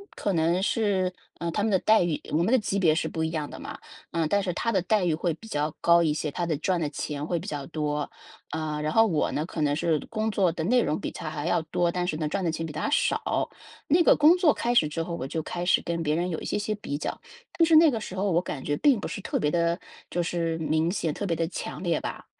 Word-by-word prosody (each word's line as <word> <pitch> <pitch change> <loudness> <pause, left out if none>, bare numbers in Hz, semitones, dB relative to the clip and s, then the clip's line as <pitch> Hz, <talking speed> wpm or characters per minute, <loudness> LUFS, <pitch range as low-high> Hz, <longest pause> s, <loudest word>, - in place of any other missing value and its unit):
可 200 - -1
能 170 +2 +2
是 195 -4 +1 0.2
呃， 170 0 -3
他 205 - -1
们 220 +1 +1
的 190 - +4
待 215 +4 +4
遇 175 -4 0
我 150 - +2
们 175 - +1
的 260 - +6
级 205 -3 -1
别 160 -5 +4
是 - - 0
不 160 - -3
一 160 - 0
样 155 -3 -3
的 - - -8
嘛， - - -7 0.4
嗯， 165 -2 +1
但 200 +3 +2
是 190 -2 -1
他 230 - -1
的 190 -4 +2
待 195 +1 +1
遇 170 - +2
会 170 +2 0
比 225 - -14
较 150 -5 -2
高 170 0 +5
一 160 -3 +2
些， 150 0 -2
他 175 +3 -2
的 160 -3 0
赚 175 +3 0
的 150 - 0
钱 145 0 -4
会 175 - 0
比 - - -6
较 145 -2 -4
多。 150 -1 -2 0.4
呃， 155 -1 -3
然 155 - -1
后 225 +6 +5
我 165 -8 0
呢， 150 - -1
可 165 -2 -5
能 145 -1 +2
是 155 0 +1
工 220 0 -1
作 190 -4 +2
的 165 -1 -4
内 245 +8 +3
容 155 - -1
比 - - -4
他 - - -6
还 145 0 -5
要 170 - +2
多， 170 +2 0
但 180 0 -2
是 155 - -1
呢， 155 -1 -1
赚 190 +5 -2
的 165 - +1
钱 165 +1 -3
比 155 - -7
他 155 - -2
少。 290 - +1 0.4
那 330 +5 +4
个 - - +6
工 305 +4 +6
作 330 -6 +4
开 240 - 0
始 160 -11 +4
之 165 +2 -3
后， 170 +1 -4
我 130 - -4
就 160 +2 -3
开 175 - -4
始 180 - +4
跟 170 0 -2
别 150 -1 +1
人 175 +2 -1
有 160 - -2
一 - - -8
些 - - -1
些 210 +1 -1
比 145 -8 -4
较。 - - -4 0.4
就 335 - +7
是 325 -1 +4
那 320 0 +8
个 225 - -2
时 190 - -7
候 195 0 0
我 170 - +3
感 145 -6 -6
觉 145 - 0
并 275 -7 +4
不 - - -4
是 - - -5
特 - - -2
别 150 - +1
地， 170 +1 +1 0.3
就 175 - -1
是 165 -1 -1
明 160 +1 +1
显， 165 -5 -1
特 205 - -4
别 170 -4 0
地 165 0 -1
强 - - -6
烈 170 -3 +1
吧。 - - -6
170 Hz, 310 characters per minute, -26 LUFS, 155-195 Hz, 0.4 s, 那